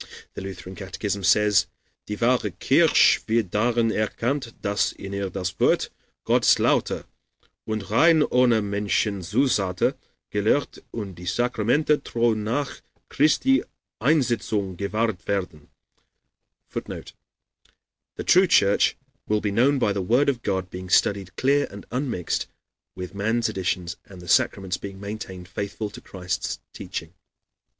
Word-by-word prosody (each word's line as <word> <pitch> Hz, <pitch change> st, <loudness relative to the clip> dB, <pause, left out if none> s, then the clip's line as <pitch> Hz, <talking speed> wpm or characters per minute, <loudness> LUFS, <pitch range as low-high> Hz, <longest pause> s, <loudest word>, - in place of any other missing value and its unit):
The -, -, -7 dB
Lutheran 95 Hz, -1 st, -8 dB
catechism 100 Hz, +1 st, -4 dB
says: 105 Hz, -2 st, +4 dB, 0.4 s
"Die 105 Hz, -, -3 dB
wahre 120 Hz, -1 st, +2 dB
kirche -, -, +5 dB
wird 110 Hz, -5 st, +1 dB
darein 115 Hz, +1 st, +2 dB
erkannt, 115 Hz, +4 st, -1 dB
dass 100 Hz, 0 st, 0 dB
in 100 Hz, 0 st, -8 dB
ihr 100 Hz, -1 st, -2 dB
das 90 Hz, 0 st, -4 dB
Wort -, -, +2 dB, 0.3 s
Gottes -, -, +4 dB
lauter -, -, +1 dB, 0.6 s
und 110 Hz, -2 st, -4 dB
rein 160 Hz, +7 st, +5 dB
ohne 125 Hz, -5 st, +3 dB
Menschenzusätze 100 Hz, 0 st, 0 dB, 0.4 s
gelehrt 110 Hz, +7 st, 0 dB
and 100 Hz, -5 st, -6 dB
die 90 Hz, +1 st, -10 dB
Sacramente 125 Hz, -, +1 dB
treu 120 Hz, -1 st, +1 dB
nach 115 Hz, +6 st, -3 dB, 0.3 s
Christi 260 Hz, -, +3 dB, 0.4 s
Einsetzung 115 Hz, -, +1 dB
gewahret 105 Hz, +1 st, -2 dB
werden." 90 Hz, -7 st, -3 dB, 1.0 s
[Footnote: -, -, -7 dB, 1.0 s
"The -, -, -4 dB
true 185 Hz, +1 st, +5 dB
Church 100 Hz, -, +4 dB, 0.3 s
will 105 Hz, 0 st, +2 dB
be 105 Hz, -, -1 dB
known 130 Hz, +7 st, +3 dB
by 105 Hz, -6 st, +1 dB
the 100 Hz, -, -2 dB
Word 135 Hz, +5 st, +4 dB
of 125 Hz, -4 st, -1 dB
God 95 Hz, -3 st, -2 dB
being 90 Hz, 0 st, -7 dB
studied 95 Hz, -1 st, +2 dB
clear 140 Hz, +2 st, +2 dB
and 100 Hz, 0 st, -10 dB
unmixed 125 Hz, -, -2 dB, 0.5 s
with 90 Hz, -1 st, -7 dB
man's 110 Hz, +3 st, 0 dB
additions 90 Hz, -3 st, -2 dB
and 95 Hz, -2 st, -13 dB
the 90 Hz, -, -12 dB
sacraments 95 Hz, +2 st, +2 dB
being 100 Hz, -1 st, -8 dB
maintained 100 Hz, -3 st, -7 dB
faithful 100 Hz, +3 st, -4 dB
to -, -, -11 dB
Christ's 90 Hz, -1 st, -4 dB
teaching." 80 Hz, +1 st, -6 dB
105 Hz, 130 wpm, -24 LUFS, 95-120 Hz, 1.0 s, kirche